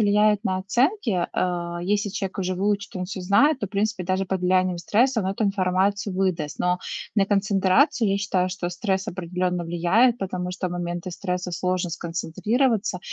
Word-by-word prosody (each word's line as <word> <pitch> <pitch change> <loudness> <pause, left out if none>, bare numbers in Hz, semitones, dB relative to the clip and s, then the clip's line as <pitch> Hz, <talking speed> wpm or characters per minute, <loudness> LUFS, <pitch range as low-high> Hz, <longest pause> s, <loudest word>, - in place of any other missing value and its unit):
влияет 210 0 +3
на 190 -4 0
оценки. 235 - +1
А, 175 -1 -2
если 205 +3 0
человек 195 -1 -4
уже 185 0 -2
выучит, 200 0 -1
он 180 - -2
всё 190 0 -6
знает, 255 +10 +3
то, 205 - -1
в - - -38
принципе, 210 -1 -1
даже 185 +2 0
под 190 0 -2
влиянием 185 0 +2
стресса 235 +6 +2
он 190 - -2
эту 195 +3 -1
информацию 195 0 +1
выдаст. 175 -6 -1
Но 180 0 +1 0.3
на 195 -2 +3
концентрацию, 200 - +3
я 195 - +2
считаю, 185 -2 0
что 180 -1 -3
стресс 190 +2 -1
определённо 180 0 -2
влияет, 185 +9 +3
потому 180 -2 -3
что 185 0 -3
в - - -6
моменты 175 0 -4
стресса 180 -1 -3
сложно 180 0 -1
сконцентрироваться, 195 - -1
190 Hz, 175 wpm, -24 LUFS, 180-205 Hz, 0.3 s, влияет